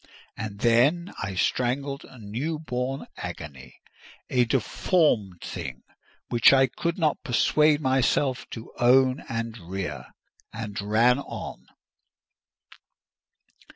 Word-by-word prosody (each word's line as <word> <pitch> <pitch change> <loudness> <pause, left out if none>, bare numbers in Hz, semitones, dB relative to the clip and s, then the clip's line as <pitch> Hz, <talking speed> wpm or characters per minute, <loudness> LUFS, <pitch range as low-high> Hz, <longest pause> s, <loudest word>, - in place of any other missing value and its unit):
And 105 -2 -6
then 135 +10 +3
I 100 -1 -3
strangled 135 +7 -1
a 130 - -15
new 120 +9 -3
born 135 -3 -3
agony—a 75 - -5
deformed 115 - +1
thing 65 -2 -6 0.5
which 120 -1 +6
I 135 -1 +6
could 170 +6 -3
not 155 -4 0
persuade 150 +2 +3
myself 130 0 +1
to 115 -1 -9
own 130 +2 +4
and 115 0 -3
rear—and 95 - -7
ran 115 +5 +3
on. - - -8
125 Hz, 95 wpm, -26 LUFS, 105-140 Hz, 0.5 s, which